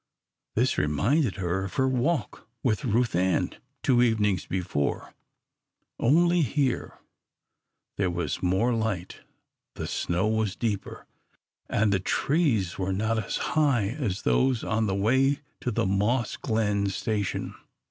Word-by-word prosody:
This - - +2
reminded 105 - +1
her 95 0 -1
of 95 - -8
her 130 - +2
walk 130 +5 -1 0.2
with 125 +3 0
Ruth 120 -2 +1
Ann 90 +1 +1 0.3
two 125 -2 +4
evenings 105 -7 +2
before, 90 -6 -2 0.9
only 170 +7 +4
here 140 -2 -1 1.0
there 100 -3 +1
was 85 -4 -3
more 95 +7 +2
light, 110 -6 -2 0.6
the - - -4
snow 90 +4 -1
was 110 -2 0
deeper, 105 -4 -3 0.6
and 105 -1 +2
the 95 - +2
trees 115 - +1
were 95 0 -1
not 110 +3 0
as - - -3 0.2
high 135 -10 +2
as 115 -7 -3
those 130 -3 +2
on 110 0 0
the 95 - 0
way 130 +8 +2 0.2
to - - -2
the 110 - 0
Moss 105 +5 +1
Glen 105 -2 0
station. 100 +1 -2
110 Hz, 130 wpm, -27 LUFS, 95-125 Hz, 1.0 s, two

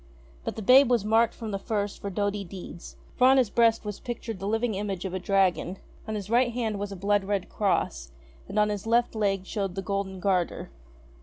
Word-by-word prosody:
But - - -4
the 220 - -5
babe 260 +4 +7
was 235 -5 +2
marked 225 +1 +3
from 225 -2 -6
the 195 - -2
first 205 -1 -3
for 200 - -3
doughty 205 +1 -1
deeds; 180 -1 -9 0.2
for 255 - +5
on 265 +1 +6
his 245 -6 +2
breast 230 -2 +3
was 210 -1 -5
pictured 230 -4 -5
the 195 - -4
living 225 +2 0
image 195 -2 -3
of 185 - -4
a 190 - -2
dragon, 190 -1 +1 0.3
on 220 - -3
his 200 -2 -5
right 240 +2 +3
hand 225 -4 -2
was 205 0 -4
a - - -5
blood 200 +2 +1
red 195 -1 -2
cross, 190 - -1 0.4
and - - -6
on 210 0 +4
his 205 +1 -4
left 235 +1 +2
leg 200 -3 0
showed 195 -3 -3
the 195 - -3
golden 195 -1 -3
garter. 180 -2 -1
205 Hz, 220 wpm, -27 LUFS, 195-225 Hz, 0.4 s, babe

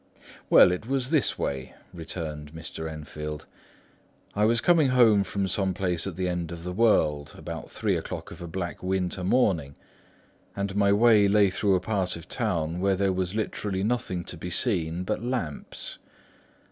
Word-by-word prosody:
"Well, - - +8
it 90 +5 -4
was 135 0 0
this 155 -5 +2
way," 65 -2 -3 0.2
returned 80 -3 -6
Mr. 80 0 -6
Enfield: 75 -1 -7 0.9
"I 105 +1 +2
was 115 +1 +3
coming 165 +1 +4
home 115 -5 +5
from 100 0 -2
some 95 0 -1
place 90 -2 -1
at 95 - -5
the 95 +1 -1
end 90 -2 -2
of 85 -1 -7
the 90 +1 -4
world, 80 -9 +2
about - - -7
three - - -1
o'clock - - -5
of - - -10
a 85 - -6
black 85 +1 -5
winter 95 0 -1
morning, 90 - +1 0.8
and 100 0 -3
my 100 -1 +3
way 105 -1 +5
lay 100 -1 +4
through 95 0 +2
a - - +2
part 95 -1 -1
of 85 - -10
town 80 +1 -1
where 95 +1 +2
there 95 0 +1
was 95 +1 -2
literally 100 -3 -2
nothing 105 -6 -1
to 90 - -8
be 90 +2 -6
seen 90 -4 0
but 90 - -2
lamps. 120 - -4
95 Hz, 170 wpm, -27 LUFS, 85-105 Hz, 0.9 s, Well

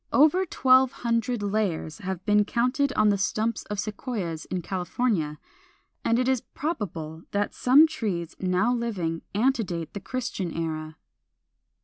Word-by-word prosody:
Over 315 +6 +4
twelve 260 -3 +4
hundred 230 -1 0
layers 200 -5 -1
have 190 -2 -5
been 210 0 +4
counted 250 +6 +1
on 215 0 +4
the 200 -1 +2
stumps 215 +3 -1
of 205 -1 -4
Sequoias 200 - -4
in 180 -2 -3
California, 180 -3 -1 0.7
and 230 - +2
it 255 0 +1
is 260 -3 +2
probable 170 - -5
that 205 0 0
some 275 +5 +6
trees 205 - -3
now 185 +6 +2
living 190 -9 -2
antedate 205 - 0
the 200 - -4
Christian 200 -4 -3
era. 155 -1 -4
210 Hz, 135 wpm, -26 LUFS, 175-245 Hz, 0.7 s, some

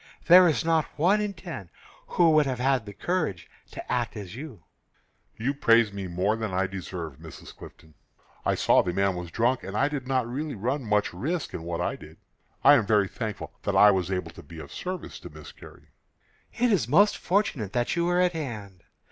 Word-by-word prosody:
There 180 +1 +8
is 160 -1 0
not 165 -2 +2
one 190 +7 +3
in 205 -2 -3
ten 165 - -8 0.4
who 170 -2 +3
would 155 -2 +4
have 130 -2 -2
had 130 -3 0
the 100 - -8
courage 100 - -2 0.2
to - - -8
act 120 -2 -1
as 100 -1 -8
you 130 - -9 0.7
did." 110 - -7
"You 135 - +2
praise 115 -6 +3
me 100 -2 -5
more 90 +5 0
than 110 -3 -4
I 95 +1 0
deserve, 90 -6 -7
Mrs. - - -12
Clifton. 80 -1 -14 0.5
I - - +1
saw - - +4
the 90 - -3
man 95 0 +1
was 90 -1 -6
drunk, 120 +7 0
and 95 +2 -5
I 140 +4 +2
did 140 -4 -5
not 130 -3 0
really 140 +4 -4
run 125 +7 -2
much 105 -3 0
risk 155 - -3
in - - -5
what 85 0 -4
I - - -1
did. - - -14 0.5
I 145 - +8
am 115 -8 +3
very 105 -2 +3
thankful 110 +1 -6
that - - -2
I 105 0 +7
was 95 -2 -1
able 95 -1 -3
to - - -12
be 80 +3 -13
of 80 - -10
service 185 0 -6
to - - -10
Miss - - -12
Carrie." - - -16 0.6
"It 245 0 +1
is 170 - +2
most 200 +11 +4
fortunate 175 - -1
that 120 +5 0
you 170 0 +1
were 175 +1 +1
at 180 -1 +3
hand. 110 - -6
115 Hz, 215 wpm, -26 LUFS, 95-155 Hz, 0.7 s, There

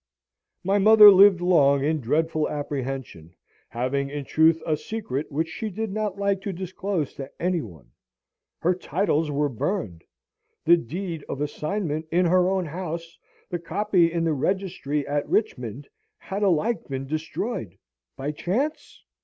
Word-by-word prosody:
My 195 +2 +2
mother 210 0 +9
lived 195 -2 +7
long 140 -6 +4
in 155 +1 0
dreadful 155 +5 0
apprehension, 135 - -5 0.3
having 135 +3 -2
in 145 0 -5
truth 160 +3 +4
a 155 - +1
secret, 150 - -5
which 160 +3 -1
she 220 +6 -5
did 220 +1 -4
not 210 -1 -2
like 200 -1 0
to 200 - -3
disclose 185 -3 -3
to 135 -1 -7
any 180 -1 0
one. 80 - -12 0.7
Her 180 +2 +3
titles 165 -3 0
were 145 0 +1
burned! 125 - -3 0.6
the 170 - +7
deed 165 +2 -5
of 140 - -4
assignment 155 +1 -3
in 180 +2 +3
her 180 +1 +3
own 190 -2 0
house, 165 0 -6 0.3
the 175 - -2
copy 175 -1 +1
in 170 0 -1
the 165 -1 +1
Registry 150 -3 -1
at 145 0 -2
Richmond, 135 - -1 0.3
had 195 +2 -5
alike 205 +4 +1
been 135 -1 -4
destroyed 155 - -4 0.4
by 140 +2 -3
chance? 240 - -3
165 Hz, 145 wpm, -25 LUFS, 145-190 Hz, 0.7 s, mother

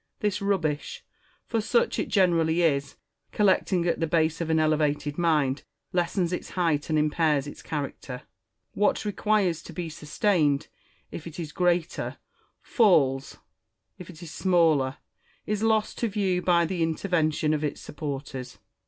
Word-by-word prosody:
This 210 -1 -1
rubbish, 170 -7 -1 0.4
for 225 - -1
such 235 +3 +1
it - - -1
generally 170 -4 +3
is, 140 -3 +1 0.4
collecting 190 -3 +2
at 170 - 0
the 165 - 0
base 160 0 +1
of 165 - -2
an 160 0 +3
elevated 150 -2 +1
mind, 150 -5 +2 0.3
lessens 175 0 0
its - - -4
height 165 -5 0
and 155 - +2
impairs 150 -1 +2
its 145 - -9
character. 140 -3 -5 0.5
What 210 +1 +1
requires 205 -4 +1
to - - -11
be 175 -2 -4
sustained, 150 -2 0 0.4
if 170 - -7
it 165 +1 -9
is 160 -3 -5
greater, 175 -1 0 0.5
falls; 140 - +2 0.6
if 180 - -10
it 175 -1 -11
is 160 - -9
smaller, 155 -7 +2 0.5
is 210 0 -2
lost 220 -1 +1
to 235 - +1
view 195 -4 0
by 175 -2 +3
the 175 +1 -3
intervention 160 -2 +1
of 155 0 -1
its 150 - -2
supporters. 135 -3 -6
165 Hz, 145 wpm, -26 LUFS, 150-185 Hz, 0.6 s, generally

